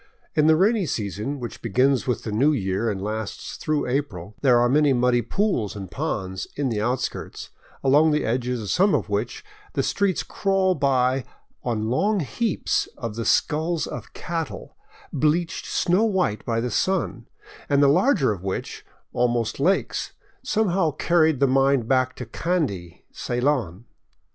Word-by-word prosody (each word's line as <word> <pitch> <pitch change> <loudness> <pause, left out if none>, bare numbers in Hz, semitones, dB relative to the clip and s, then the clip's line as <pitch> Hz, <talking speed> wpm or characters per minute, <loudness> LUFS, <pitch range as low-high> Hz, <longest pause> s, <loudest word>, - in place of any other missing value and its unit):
In 150 -1 +3
the 160 - +6
rainy 200 +2 +2
season, 110 +5 -3
which 120 -2 -7
begins 130 +4 +2
with 125 - -1
the 110 - -4
new 130 +9 +3
year 100 -2 -1
and 100 -3 -3
lasts 110 +1 -5
through 155 -2 -1
April, 110 -8 -3
there 125 -4 +5
are 120 - +4
many 145 +2 +3
muddy 125 -1 +2
pools 120 - -1
and 95 -3 -7
ponds 95 +1 -3
in 140 -2 -1
the 110 -3 -1
outskirts, 125 +3 -3 0.3
along 145 +4 +5
the 150 0 +1
edges 125 0 -1
of 100 - -3
some 195 +1 +3
of 115 - -2
which 105 +4 -3 0.3
the - - 0
streets 200 -2 0
crawl 195 -1 +1
by 135 -3 +1 0.4
on 110 -2 -1
long 200 - +2
heaps 185 - -1
of 115 -3 -4
the 115 +1 -4
skulls 160 +2 +1
of 125 -1 -8
cattle, 165 -2 -5 0.4
bleached 165 +3 0
snow 185 +4 +2
white 185 - 0
by 115 -1 0
the 120 +1 -2
sun, 180 - -1 0.4
and 140 0 +4
the - - +6
larger 140 - +3
of 100 -4 -5
which, 95 0 -4 0.3
almost 120 -1 0
lakes, 180 +8 0 0.3
somehow 190 -6 +1
carried 160 -1 +2
the 140 - +4
mind 135 -2 +2
back 130 0 +1
to 125 - -6
Kandy, 115 - -3
Ceylon. 120 - -1
130 Hz, 160 wpm, -24 LUFS, 115-160 Hz, 0.4 s, the